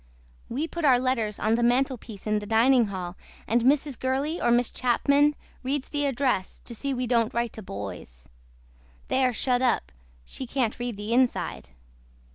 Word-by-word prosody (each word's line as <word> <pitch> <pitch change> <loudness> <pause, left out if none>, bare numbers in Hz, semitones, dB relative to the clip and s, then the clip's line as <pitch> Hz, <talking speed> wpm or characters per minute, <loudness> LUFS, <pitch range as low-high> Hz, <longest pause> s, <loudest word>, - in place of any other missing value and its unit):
WE 285 +7 -2
PUT 340 0 -5
OUR 265 -4 +6
LETTERS 245 -5 0
ON 215 +1 +1
THE 235 - +2
MANTLEPIECE 240 -4 0
IN 215 -1 +1
THE 205 - -8
DINING 235 +2 +4
HALL 185 -2 -5 0.3
AND 235 +2 +2
MRS. 275 +1 +2
GURLEY 275 +6 -1
OR 240 - +2
MISS 240 0 +3
CHAPMAN 280 +4 +2 0.3
READ 270 +1 -1
THE 290 -1 0
ADRESS 255 -8 -1
TO 235 - -7
SEE 275 +5 -3
WE 255 -1 -1
DON'T 230 -2 +1
WRITE 235 -1 -1
TO 220 - -8
BOYS. 95 - -8 0.8
THEY 260 0 +2
ARE 250 - +1
SHUT 245 +1 +1
UP 65 - +1 0.3
SHE 260 - -7
CANT 245 -3 -1
READ 240 -3 -3
THE 210 +3 -3
INSIDE. 235 - 0
245 Hz, 175 wpm, -26 LUFS, 215-265 Hz, 0.8 s, OUR